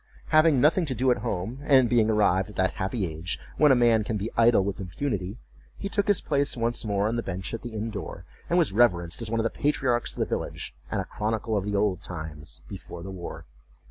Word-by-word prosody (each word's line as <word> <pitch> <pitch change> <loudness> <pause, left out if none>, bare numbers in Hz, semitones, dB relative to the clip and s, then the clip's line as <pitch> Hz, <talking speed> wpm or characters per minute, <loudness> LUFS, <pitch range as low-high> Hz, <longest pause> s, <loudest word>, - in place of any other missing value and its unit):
Having 155 -3 +5
nothing 160 +5 +3
to 130 - -2
do 130 +3 +2
at 125 - +2
home, 115 +2 -3
and 135 -4 +5
being 115 -2 +3
arrived 105 -2 +2
at 105 - -12
that 95 - +2
happy 95 +2 -2
age 80 -1 -4 0.2
when 150 -2 +6
a - - +6
man 120 -3 +4
can 110 +1 -2
be 105 +3 -4
idle 115 -3 +5
with 100 0 -3
impunity, 100 +1 -3 0.4
he 200 - -4
took 205 +1 0
his 205 -2 +3
place 140 -2 0
once 120 +1 0
more 100 -1 0
on 115 +2 -1
the - - 0
bench 95 -1 -5
at 115 - -4
the 120 -2 -7
inn 110 +1 -3
door, 100 -4 -7 0.2
and 175 - +2
was 160 - +3
reverenced 90 -6 +2
as 115 - -3
one 115 0 0
of - - +1
the 115 - 0
patriarchs 130 -4 0
of - - -9
the - - +2
village, - - -4 0.2
and - - -1
a - - -6
chronicle 110 +1 -2
of 100 -2 0
the 105 0 -2
old 100 -2 +1
times 80 -3 -7
"before 85 - -9
the 95 - -6
war." 90 -2 -7
110 Hz, 235 wpm, -26 LUFS, 95-125 Hz, 0.4 s, when